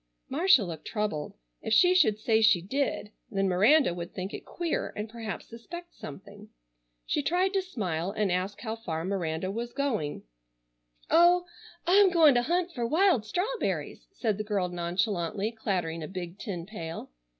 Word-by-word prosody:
Marcia 310 - +5
looked 165 -4 -7
troubled. 210 -9 -3 0.3
If - - -1
she 360 +9 +6
should 265 - +4
say 220 +1 +2
she 215 -4 +5
did 210 +2 -2 0.2
then 195 -4 0
Miranda 210 - +4
would 170 0 -7
think 190 +2 -4
it - - -7
queer 345 -2 -2
and 210 +1 -4
perhaps 225 -2 -6
suspect 345 +10 -10
something. 200 +7 -11 0.6
She - - 0
tried 360 +6 +1
to 390 - +2
smile 190 - -3
and 205 -1 0
ask 185 +3 -2
how 220 -2 -3
far 165 -7 -4
Miranda 185 -2 -2
was 235 +3 -4
going. 235 - -2 0.9
"Oh, 350 +2 +6 0.4
I'm 390 +2 +6
goin' 325 -5 +6
to 245 - +3
hunt 350 +6 0
fer 245 -7 -4
wild 305 - +3
strawberries," 425 - -2
said 220 - -1
the - - -1
girl 200 -4 -1
nonchalantly 180 +3 -1
clattering 180 -7 -2
a 155 - -5
big 180 0 -7
tin 180 -7 -5
pail. 170 -5 -7
215 Hz, 160 wpm, -28 LUFS, 185-295 Hz, 0.9 s, she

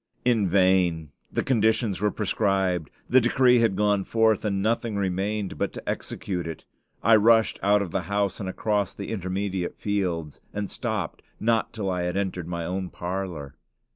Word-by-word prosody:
In 115 -5 +3
vain. 90 -4 +2 0.2
The - - 0
conditions 110 -4 +1
were 105 - +3
prescribed; 95 -6 0 0.2
the 130 +1 +5
decree 125 +1 +4
had 115 -4 +2
gone 105 -1 +2
forth, 110 0 +2
and 100 -2 0
nothing 110 +1 0
remained 100 +1 -2
but - - -1
to - - -9
execute 90 -4 -3
it. 80 - -7 0.4
I 115 +1 +6
rushed 110 +1 +4
out 100 +1 +3
of 90 - -7
the 95 - 0
house 100 -2 0
and 95 -3 -3
across 105 +1 -1
the 100 - -6
intermediate 95 -2 -3
fields, 90 -7 -2
and 105 -1 -3
stopped - - -3 0.2
not 115 0 +1
till 100 -4 -3
I 90 -1 -1
entered 90 -1 -2
my 85 -1 -3
own 95 +1 -3
parlor. 90 -7 -5
100 Hz, 165 wpm, -25 LUFS, 90-110 Hz, 0.4 s, I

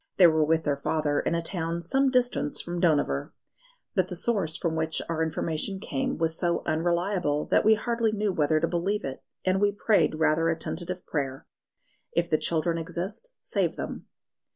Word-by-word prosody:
They 185 - +8
were 160 -2 +5
with 160 +1 +2
their 145 -1 +1
father 145 0 0
in - - 0
a 170 - -1
town 170 -1 -3
some 270 - +2
distance 245 - +1
from 175 0 -4
Dohnavur; 150 -2 +1 0.6
but 185 -2 +2
the 180 - -5
source 185 -5 0
from 165 -2 -1
which 160 0 -1
our 165 -1 -1
information 160 +4 -1
came 265 +6 -2
was 160 0 +1
so 170 0 0
unreliable 170 -2 0
that - - +4
we 220 +1 +6
hardly 230 0 0
knew 210 -2 0
whether 155 -1 +2
to - - +1
believe 190 +4 -1
it, 135 -1 -5 0.3
and 185 +1 +2
we 205 0 +4
prayed 205 -4 +2
rather 160 +1 +2
a 165 - 0
tentative 175 +2 -3
prayer: 135 -3 -3 0.7
"If 170 0 0
the 155 - +3
children 165 0 +1
exist, 185 - -5
save - - 0
them." - - -6
170 Hz, 180 wpm, -27 LUFS, 160-195 Hz, 0.7 s, They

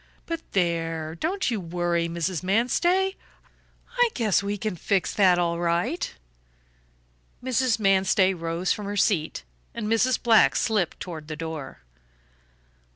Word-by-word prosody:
But 330 -1 -4
there, 165 -3 -1
don't 350 - -1
you 225 - -1
worry, 170 -1 -1
Mrs. 170 0 -2
Manstey. 345 - +1 0.8
I 485 -1 +5
guess 215 -6 +2
we 200 +1 -3
can 215 -1 -3
fix 190 +3 0
that 185 -3 +4
all 170 -1 0
right." 175 - -1 1.3
Mrs. 255 -2 +1
Manstey 195 -1 +3
rose 170 +1 -2
from 205 -1 -6
her 205 0 -3
seat, 160 - +1 0.3
and 230 -2 -3
Mrs. 225 +3 +2
Black 230 -2 +5
slipped 210 -7 0
toward 160 -4 -7
the 155 - -5
door. 160 -3 -7
190 Hz, 130 wpm, -25 LUFS, 170-225 Hz, 1.3 s, I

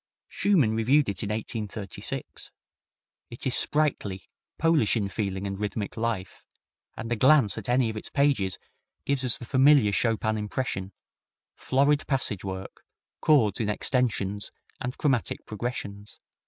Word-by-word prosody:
Schumann 150 - +2
reviewed 130 +4 +3
it 100 - -4
in 105 - -3
1836. 105 -2 -5 0.8
It 120 - -8
is 130 - +1
sprightly, 135 -11 +1 0.3
Polish 160 -9 +3
in 100 -3 -1
feeling 100 -2 -3
and 100 0 -4
rhythmic 105 0 -3
life, 110 -5 -3 0.5
and 115 +1 -6
a - - +2
glance 130 -2 +4
at 110 +1 -6
any 125 -1 +3
of 110 - -4
its 110 - -7
pages 135 -11 +1 0.5
gives 140 -1 +1
us 125 -3 +3
the 120 - -9
familiar 130 -3 +5
Chopin 110 0 0
impression 105 -3 -3 0.6
florid 140 +3 +1
passage 130 -8 +1
work, 95 0 -7 0.4
chords 115 -11 +3
in 110 -3 -1
extensions 105 -4 -1 0.3
and 125 +2 -4
chromatic 135 -6 0
progressions. 105 -2 -6
110 Hz, 135 wpm, -27 LUFS, 100-130 Hz, 0.8 s, familiar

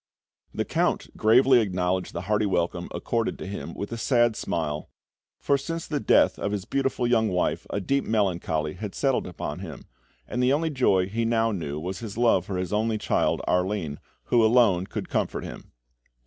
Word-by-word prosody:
The - - -2
Count - - -1
gravely 125 +4 +5
acknowledged 90 -2 -1
the 85 - -3
hearty 105 +3 +1
welcome 90 -1 -1
accorded 115 -1 -2
to - - -7
him 100 +2 -6
with 100 - -5
a 115 - -4
sad 120 -2 +3
smile, 75 -6 -3 0.5
for 140 -1 +1
since 165 +4 -4
the 150 - -2
death 105 - +3
of 100 - -2
his 100 -2 -3
beautiful 135 0 -1
young 115 -2 +3
wife 90 -1 -1
a - - -2
deep 140 +8 0
melancholy 85 -7 0
had 105 +1 -7
settled 135 -2 +1
upon 90 - -5
him, - - -8 0.4
and 125 - -2
the 125 +2 +3
only 160 +2 0
joy 95 -9 +2
he 115 +4 -2
now 115 0 +2
knew 75 -7 -4
was 90 +4 -5
his 110 -2 -7
love 115 -7 +3
for 95 - -3
his 90 +1 -3
only 110 +1 +1
child, 105 - 0
Arline, 90 -5 0 0.2
who 120 -2 +3
alone 110 -6 +4
could - - -5
comfort - - -2
him. - - -9
105 Hz, 185 wpm, -26 LUFS, 90-120 Hz, 0.5 s, gravely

